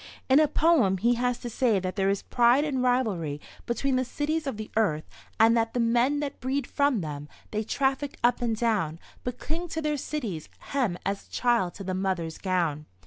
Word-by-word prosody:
In 265 +3 +7
a 310 - +5
poem 290 - +3
he 235 +6 +3
has 245 0 0
to - - -5
say 225 -4 +2
that 185 0 -4
there 195 -2 +2
is 200 0 0
pride 245 +3 +4
and 270 -4 -1
rivalry 210 - 0 0.3
between 255 +2 0
the 255 - +2
cities 300 +4 -2
of 265 - -3
the 215 0 -7
earth, 160 -9 +1 0.3
and 225 +1 +6
that 225 0 0
"the - - +1
men 240 +5 +2
that 285 -1 -4
breed 265 +1 -1
from 280 -6 +1
them, 150 -2 -6 0.2
they 215 - -1
traffic 270 +4 -1
up 245 +1 +3
and 230 -2 +1
down, 205 -9 0 0.3
but 245 0 -4
cling 330 +6 -4
to 320 - -4
their 300 -1 0
cities' 230 - -4
hem 245 -11 -1
as 195 +1 -3
a - - -31
child 235 -8 +1
to 200 - -7
the 185 0 -3
mother's 185 -4 -2
gown." 170 -6 -1
235 Hz, 205 wpm, -27 LUFS, 190-270 Hz, 0.3 s, In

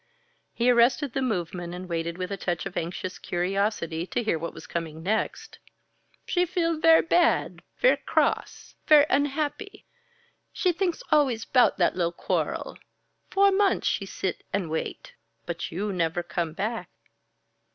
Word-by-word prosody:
He 240 +1 +2
arrested 245 +3 +3
the 270 - -1
movement 175 -6 -3
and 180 +1 -7
waited 170 0 -3
with 185 +1 -4
a - - -1
touch 175 -3 -3
of 195 - -6
anxious 180 +2 -4
curiosity 180 -2 -1
to 240 - -2
hear 190 -7 0
what 170 +1 -4
was - - -11
coming 160 -2 -5
next. 215 +4 -2 0.7
"She 355 - +1
feel 335 -2 0
ver' 325 0 +6
bad 340 +1 +2 0.2
ver' - - +4
cross, - - -1
ver' 300 -2 +8
unhappy. 290 +1 -1 0.7
She 365 - +1
thinks 350 0 -2
always 265 -7 +3
'bout 250 -2 +4
that 175 - +2
li'l' 170 -1 0
quarrel. - - -2 0.5
Four 395 0 +4
months 390 0 +2
she 195 - 0
sit 190 -1 -3
and 185 -5 -2
wait 160 - -4 0.3
but 170 -1 -4
you 200 +4 -2
never 175 0 0
come 170 -2 -3
back." 215 +6 -3
200 Hz, 150 wpm, -26 LUFS, 175-290 Hz, 0.7 s, ver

